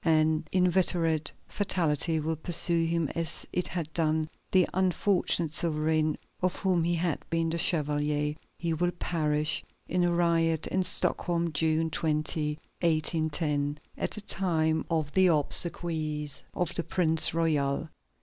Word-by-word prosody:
An 160 0 +2
inveterate 175 -4 +2 0.2
fatality 165 -5 0
will 160 +1 -1
pursue 165 +1 +1
him 165 -1 0
as 165 0 -3
it 180 - -1
had 165 -3 -4
done 155 -1 0 0.2
the 185 -2 +4
unfortunate 180 -3 +1
sovereign 155 -1 +1 0.2
of 185 0 0
whom 185 -4 +1
he 170 +1 +1
had 165 -2 -1
been 165 -1 0
the 170 - -2
chevalier. 150 -2 0 0.2
He 170 -1 -1
will 175 +2 +1
perish 155 -3 -1 0.2
in 180 0 +1
a 175 - +2
riot 165 -2 +1
at 185 0 0
Stockholm, 170 -3 -1
June 160 +2 +1
20, 150 -1 0 0.2
1810, 155 -3 0 0.2
at - - -2
the 210 - -3
time 160 -6 0
of 160 -3 -1
the 190 -1 +5
obsequies 155 -2 +1
of 175 -3 -1
the 170 - -2
Prince 160 -3 +3
Royal. 150 -4 0
165 Hz, 135 wpm, -28 LUFS, 155-175 Hz, 0.2 s, the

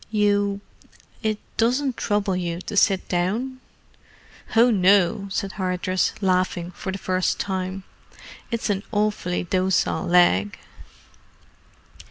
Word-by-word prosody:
"You—it 205 +1 -2 0.2
doesn't 255 +3 +1
trouble 205 -4 0
you 170 -2 -3
to 205 - -6
sit 195 -1 +3
down?" 220 +9 -1 1.0
"Oh, 235 +2 +6
no!" 200 0 +3
said 195 0 -2
Hardress, 185 -1 -1
laughing 185 -2 0
for 190 - -6
the 190 - -4
first 185 -1 -1
time. 190 0 -3 0.7
"It's 230 -3 -1
an 195 -1 -1
awfully 205 -5 0
docile 185 -2 0
leg!" 105 - +3
195 Hz, 105 wpm, -23 LUFS, 185-210 Hz, 1.0 s, Oh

